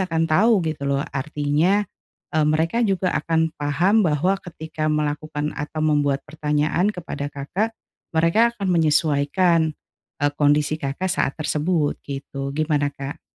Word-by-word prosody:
akan 165 -3 0
tahu 195 +4 +3
gitu 155 -3 -2
loh, 140 +1 0
artinya 150 +8 +1 0.5
eee, 155 -2 +2
mereka 160 +7 +1
juga 195 -4 +1
akan 160 0 +1
paham 175 +9 +3
bahwa 175 +6 +1
ketika 160 -3 -5
melakukan 150 0 -1
atau 155 +1 -4
membuat 145 -2 +1
pertanyaan 150 +4 0
kepada 160 -5 -5
Kakak 185 +11 -3 0.4
mereka 210 +9 +3
akan 200 - -3
menyesuaikan, 160 0 +2 0.5
eee, 145 0 +2
kondisi 150 +1 +2
Kakak 145 +7 -2
saat 160 -6 0
tersebut 155 0 0
gitu, 140 0 -5
gimana, 150 -2 +1
Kak? 140 +1 -6
155 Hz, 130 wpm, -22 LUFS, 145-175 Hz, 0.5 s, tahu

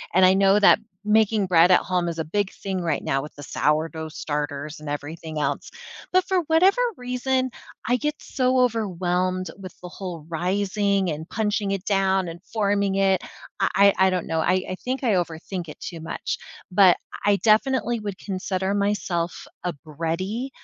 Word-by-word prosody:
and 185 0 +7
I 185 - +6
know 195 +1 +4
that 205 - +6 0.3
making 215 -1 +3
bread 175 -1 +5
at 180 - +7
home 180 -1 -1
is 165 - -5
a 160 - -1
big 200 +5 -1
thing 190 -2 -4
right 165 -4 -1
now 135 0 0
with 150 - -9
the 145 - -10
sourdough 160 +2 -1
starters 150 0 -4
and 155 -1 -7
everything 155 +2 -5
else, 150 - -2 0.4
but 370 0 +4
for 380 -1 +2
whatever 370 +9 +4 0.2
reason, 255 +1 -1 0.4
I 245 +1 +3
get 300 +4 -1
so 255 -1 +1
overwhelmed 185 -5 0
with 185 -3 -10
the 180 - -8
whole 175 -4 -7
rising, 195 +2 0
and 155 +2 -6
punching 210 -2 -1
it 195 -1 -3
down, 195 -2 +2
and 170 +1 -9
forming 200 -2 0
it. 195 -2 +3 0.4
I - - +3
I 200 0 +6
I - - +4
don't 180 -2 -1
know, 160 0 0
I 185 +3 +2
I - - -2
think 260 +2 -2
I 230 -4 +3
overthink 175 0 -3
it - - -10
too 170 - -7
much 160 +1 -4 0.3
but 185 -1 +6 0.3
I 205 0 +5
definitely 235 +3 +2
would 205 -3 -5
consider 190 0 -2
myself 195 -4 -1 0.2
a 180 - -1
bready, 170 - -3
190 Hz, 175 wpm, -24 LUFS, 170-210 Hz, 0.4 s, and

